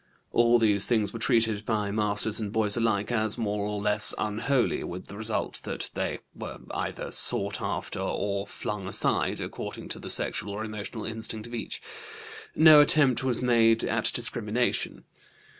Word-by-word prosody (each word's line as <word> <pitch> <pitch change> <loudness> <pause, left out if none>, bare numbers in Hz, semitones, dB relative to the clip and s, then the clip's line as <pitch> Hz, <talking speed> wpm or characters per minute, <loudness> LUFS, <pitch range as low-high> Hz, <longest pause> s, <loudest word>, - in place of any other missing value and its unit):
All 120 0 +4
these 105 -3 +4
things 110 -4 0
were 115 - -6
treated 110 -2 +1
by 105 -2 -1
masters 105 +1 +1
and 105 -2 -4
boys 110 -2 +1
alike 110 -2 0
as 110 -2 0
more 105 -3 -2
or 105 0 -3
less 105 +1 +4
unholy, 120 +5 0
with 90 +1 -7
the 100 - -11
result 110 +1 -1
that - - -4
they - - -2 0.2
were - - -8
either - - -4
sought 100 0 +2
after - - -4
or 100 0 -2
flung 100 -2 -5
aside, - - 0
according - - -7
to - - -5
the - - -8
sexual 100 - 0
or 110 +2 -4
emotional 110 +1 -6
instinct 110 -1 -3
of 120 - -11
each. 120 - -5 0.7
No 155 -2 +8
attempt 145 -5 +3
was 130 -1 +3
made 115 -2 +4
at 115 0 0
discrimination. 120 0 -1
110 Hz, 160 wpm, -27 LUFS, 105-120 Hz, 0.7 s, No